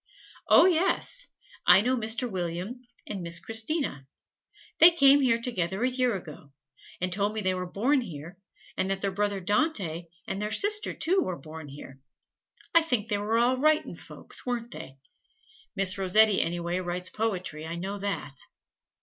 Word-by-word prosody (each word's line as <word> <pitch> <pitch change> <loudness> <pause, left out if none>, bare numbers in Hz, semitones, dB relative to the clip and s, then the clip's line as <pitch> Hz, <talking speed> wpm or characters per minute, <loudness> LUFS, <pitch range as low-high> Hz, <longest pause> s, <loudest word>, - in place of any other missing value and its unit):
"Oh, - - +7
yes; 375 +7 +2 0.4
I 195 - +8
know 250 +4 +1
Mr. 230 +1 0
William 185 +4 -4 0.2
and 200 -3 -5
Miss 170 0 +1
Christina. 225 - -1 0.7
They 330 - +10
came 285 -4 +5
here 235 -3 +2
together 195 -4 -2
a 255 - +3
year 250 -3 +1
ago, 150 -6 -10 0.5
and 185 0 -1
told 205 +2 -1
me 220 - -2
they 185 -2 0
were 180 0 -4
born 255 +9 +1
here 170 - -9 0.4
and 190 +1 -1
that 195 0 -2
their 200 - -1
brother 205 0 -1
Dante 190 - -1 0.2
and 195 - -4
their 210 - -2
sister, 415 - +2
too, 365 +4 +1
were 185 - -3
born 155 +2 -10
here. 135 -1 -11 0.7
I 335 - +7
think 250 -9 -2
they 205 -2 0
were 215 +2 0
all 245 +2 +2
writin' 310 +3 +1
folks, - - -9
weren't 240 -1 -4
they? 135 - -10 0.8
Miss 195 -1 +1
Rossetti 200 +2 +4
anyway 175 +1 -2
writes 180 0 -3
poetry, 185 -8 -3
I 165 - -5
know 195 +4 -5
that. 190 -9 -4
200 Hz, 165 wpm, -27 LUFS, 175-245 Hz, 0.8 s, They